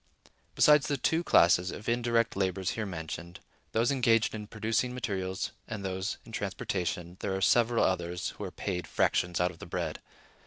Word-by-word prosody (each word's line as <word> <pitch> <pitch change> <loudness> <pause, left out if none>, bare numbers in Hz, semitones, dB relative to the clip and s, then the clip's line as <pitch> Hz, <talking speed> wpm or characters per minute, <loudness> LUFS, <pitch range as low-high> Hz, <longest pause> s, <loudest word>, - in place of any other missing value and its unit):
Besides 150 -2 +6
the 145 - 0
two 160 +5 +1
classes 90 - +5
of 105 - -8
indirect 115 0 +1
laborers 95 -1 0
here 110 -2 -3
mentioned, 85 -1 -6 0.3
those 115 +4 +2
engaged 115 -4 +3
in 105 -1 -6
producing 115 +3 -1
materials 95 -6 -3 0.2
and 105 -3 -5
those 95 +2 -2
in - - -12
transportation, 95 -5 -3
there 95 -1 -2
are - - -1
several 115 +3 +3
others 90 -1 -1
who - - -8
are 95 - -3
paid 90 -2 -4
fractions 90 0 +1
out 90 +1 +2
of 85 - -16
the - - -9
bread. - - -3
100 Hz, 170 wpm, -30 LUFS, 90-115 Hz, 0.3 s, Besides